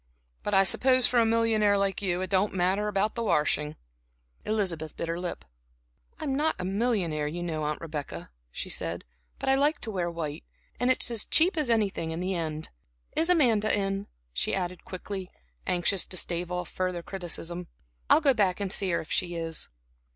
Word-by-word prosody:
But 205 - 0
I 195 - +7
suppose 255 +6 +4
for 245 - +4
a 230 - +4
millionaire 225 -3 +3
like 195 0 0
you 185 -2 0
it 185 - -3
don't 195 +1 +2
matter 190 +3 +1
about 210 +1 +1
the 235 - -3
washing." 150 -5 +1 0.7
Elizabeth 180 -8 -1
bit - - -3
her 165 +1 -2
lip. 180 -1 -5 0.7
"I'm 285 -3 -2
not 310 +3 +1
a 185 - -4
millionaire, 190 -7 0
you 175 +3 -4
know 160 -3 -2
Aunt 150 0 -1
Rebecca," 150 - -6 0.2
she - - -4
said, 85 +1 -2 0.3
"but - - -5
I 265 - +5
like 290 +3 +3
to 225 - -2
wear 180 -4 -1
white, 160 -3 -4 0.4
and 245 - +2
it's 255 -1 +2
as 225 -3 +2
cheap 345 +4 +4
as 300 -6 0
anything 205 -7 +1
in 160 +1 -3
the 185 +2 -1
end. 160 -3 -3 0.5
Is 330 +2 +2
Amanda 235 -11 +4
in?" 195 0 -1 0.3
she - - 0
added 180 -2 -3
quickly, 190 0 -6 0.4
anxious 180 +1 +1
to 185 - -2
stave 175 0 -1
off 180 0 -2
further 185 -2 -2
criticism. 175 -2 -5 0.4
"I'll 315 - +7
go 280 -3 +5
back 200 -5 +2
and 200 -2 -2
see 195 -1 +3
her 170 - +1
if 160 - -11
she 175 -1 0
is." 165 -1 -2
190 Hz, 190 wpm, -28 LUFS, 170-220 Hz, 0.7 s, I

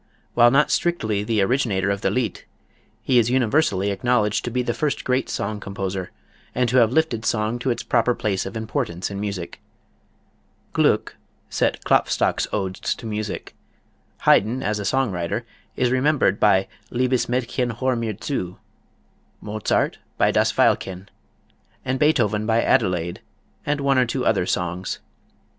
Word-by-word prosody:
While 120 0 +6
not 140 +4 +3
strictly 110 -13 0
the 105 -2 +1
originator 100 -5 +1
of 100 0 -2
the - - +1
Lied, 120 -6 -1 0.6
he 125 -2 +4
is 115 0 +2
universally 120 -5 +2
acknowledged 105 +1 +1
to - - -1
be 125 +1 -1
the 120 - -1
first 150 +2 -1
great 130 +1 0
song 105 +1 -3
composer 95 -2 -4 0.5
and 125 0 +2
to 125 - +2
have 115 -2 +5
lifted 130 -7 +1
song 110 +1 0
to 130 - -1
its 120 - -1
proper 120 0 +2
place 95 -3 -1
of 95 - -6
importance 110 - -3
in 100 - -5
music. 100 -4 -5 1.1
Gluck - - +1 0.3
set - - 0
Klopfstock's - - +2
odes 95 -2 -2
to - - -11
music; 105 -2 -4 0.7
Haydn 120 +6 +3
as 105 0 -1
a 100 - -4
song 130 0 +1
writer 85 -2 -3 0.3
is 125 -1 +1
remembered 130 -6 +2
by 95 -2 +4 0.2
"Liebes 125 0 +1
Mädchen 125 -1 -1
hör' 130 0 +1
mir 115 -3 -2
Zu"; 90 -11 -3 0.8
Mozart 105 0 -1 0.2
by - - +3
"Das - - +2
Veilchen"; 95 +1 +1 0.8
and 130 +1 -1
Beethoven 110 -9 +2
by 115 0 +3
"Adelaide" 90 -4 +1 0.5
and 145 0 +1
one 140 -1 +2
or 125 - +3
two 125 +2 -2
other 95 -5 +2
songs. 90 +1 -2
110 Hz, 150 wpm, -23 LUFS, 100-125 Hz, 1.1 s, While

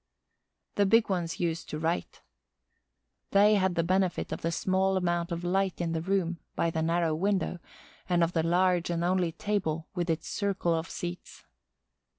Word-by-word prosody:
The 200 -1 +4
big 225 +2 +4
ones 175 -3 -2
used 165 -2 -2
to 150 - -4
write. 165 +2 -2 1.1
They 205 +2 +5
had 190 -3 +2
the 165 - +2
benefit 185 +1 0
of - - -4
the 165 - -1
small 190 +2 +1
amount 175 -2 0
of 170 0 -3
light 190 +1 0
in 170 -1 -1
the 165 -1 -1
room, 180 -2 0 0.2
by 170 - +1
the 160 -1 -1
narrow 165 0 +1
window, 190 +1 0 0.5
and 175 -1 +3
of 170 +1 0
the 165 - +2
large 175 +1 +2
and 170 0 -1
only 180 -1 +1
table 165 -3 -2
with 175 -2 -2
its 160 0 -1
circle 195 -4 0
of 165 +2 -2
seats. 175 0 -7
175 Hz, 170 wpm, -29 LUFS, 165-190 Hz, 1.1 s, They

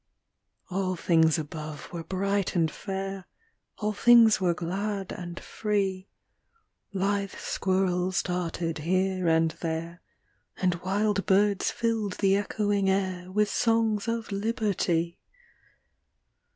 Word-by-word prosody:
All 185 0 -1
things 160 -2 +3
above 155 0 -7
were 170 -1 -4
bright 195 +3 -1
and 165 -3 +2
fair, 195 0 -5 0.5
All 210 0 -1
things 230 -1 +6
were 175 -2 +2
glad 195 +3 -3
and 175 0 -6
free; 195 -3 -2 0.8
Lithe 200 +1 -1
squirrels 185 -1 0
darted 170 -2 -2
here 185 +2 0
and 160 0 +3
there, 165 +1 -4 0.6
And 180 -2 0
wild 200 +2 0
birds 200 0 +3
filled 225 -4 -1
the 195 0 +2
echoing 205 -1 0
air 185 -2 -1
With 210 +1 +1
songs 225 -2 +1
of 230 -1 -2
Liberty! 200 -6 0
190 Hz, 110 wpm, -27 LUFS, 175-205 Hz, 0.8 s, things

